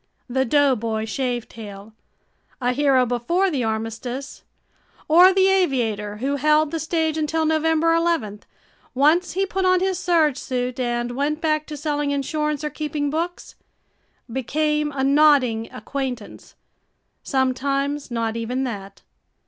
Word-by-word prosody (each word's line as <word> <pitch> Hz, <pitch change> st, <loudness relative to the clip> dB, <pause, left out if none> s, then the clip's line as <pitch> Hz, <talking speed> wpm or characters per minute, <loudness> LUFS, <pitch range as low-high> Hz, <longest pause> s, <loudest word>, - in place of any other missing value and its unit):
The 265 Hz, +1 st, 0 dB
"doughboy 230 Hz, -5 st, +1 dB
shavetail", 225 Hz, -4 st, -5 dB, 0.7 s
a 250 Hz, -1 st, +1 dB
hero 270 Hz, -2 st, +3 dB
before 335 Hz, +11 st, 0 dB
the 270 Hz, -5 st, -1 dB
armistice, 225 Hz, +5 st, -4 dB, 0.7 s
or 355 Hz, +4 st, +7 dB
the 380 Hz, 0 st, +3 dB
aviator 235 Hz, -, 0 dB
who 275 Hz, +5 st, -1 dB
held 305 Hz, +1 st, +3 dB
the 330 Hz, -, -2 dB
stage 320 Hz, -1 st, -1 dB
until 315 Hz, +1 st, 0 dB
November 320 Hz, +1 st, +2 dB
eleventh, 330 Hz, -12 st, -1 dB, 0.5 s
once 310 Hz, +7 st, +3 dB
he 385 Hz, +2 st, +1 dB
put 385 Hz, 0 st, -2 dB
on 370 Hz, 0 st, +4 dB
his 375 Hz, -1 st, -1 dB
serge 330 Hz, -7 st, +2 dB
suit 250 Hz, 0 st, -3 dB
and 240 Hz, -1 st, -1 dB
went 295 Hz, +3 st, -1 dB
back 310 Hz, -1 st, 0 dB
to 300 Hz, -, -6 dB
selling 295 Hz, 0 st, -1 dB
insurance 300 Hz, +1 st, -1 dB
or 300 Hz, -, -2 dB
keeping 295 Hz, -2 st, -3 dB
books, 340 Hz, +3 st, -4 dB, 0.7 s
became 300 Hz, +5 st, -1 dB
a 270 Hz, -2 st, -2 dB
nodding 270 Hz, -6 st, +3 dB
acquaintance, 250 Hz, -1 st, -6 dB, 0.7 s
sometimes 275 Hz, +2 st, -1 dB
not 230 Hz, -2 st, -2 dB
even 240 Hz, +3 st, -2 dB
that. 200 Hz, -6 st, -6 dB
280 Hz, 130 wpm, -22 LUFS, 245-310 Hz, 0.7 s, or